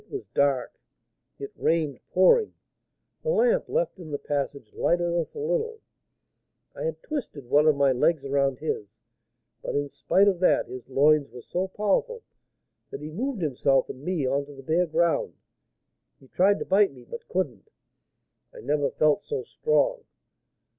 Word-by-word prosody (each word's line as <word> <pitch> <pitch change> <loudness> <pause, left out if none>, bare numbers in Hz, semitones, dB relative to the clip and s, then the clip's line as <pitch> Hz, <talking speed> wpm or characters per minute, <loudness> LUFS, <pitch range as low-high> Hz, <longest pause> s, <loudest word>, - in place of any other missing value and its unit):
It - - -30
was 405 - -6
dark, 140 -3 0 0.6
it 140 - -7
rained 155 -5 0
pouring; 190 - +4 0.7
the 475 - -3
lamp - - +2
left - - -1
in 165 -3 -9
the 145 - -2
passage 140 -5 -4
lighted 175 0 +1
us 170 -2 -2
a - - -6
little. 455 -1 -1 1.0
I - - -5
had 485 - -4
twisted 260 - -5
one 145 +5 +4
of 155 - +5
my 140 -1 +3
legs 140 +3 +1
around 135 -1 +1
his, 110 -8 -5 0.6
but, - - -4
in 145 0 -1
spite 195 +7 +2
of 190 -3 +2
that, 185 - +3
his 130 0 -10
loins 145 +2 +3
were 120 +1 -11
so 185 +2 -2
powerful 210 - -1 0.7
that - - -7
he 155 +1 -7
moved 230 - -3
himself 135 -2 +1
and 130 - -12
me 175 -4 -1
on 140 +2 0
to 145 - -11
the 135 - -12
bare 165 +5 +1
ground. 165 +1 +1 0.8
He 135 - -19
tried 195 +8 +3
to - - -5
bite 200 -1 +4
me, 125 -3 -15
but 235 - -9
couldn't; 145 - -3 0.8
I - - -12
never 145 -1 0
felt 155 +5 +2
so 445 - -4
strong. 480 +1 0
160 Hz, 165 wpm, -26 LUFS, 140-210 Hz, 1.0 s, of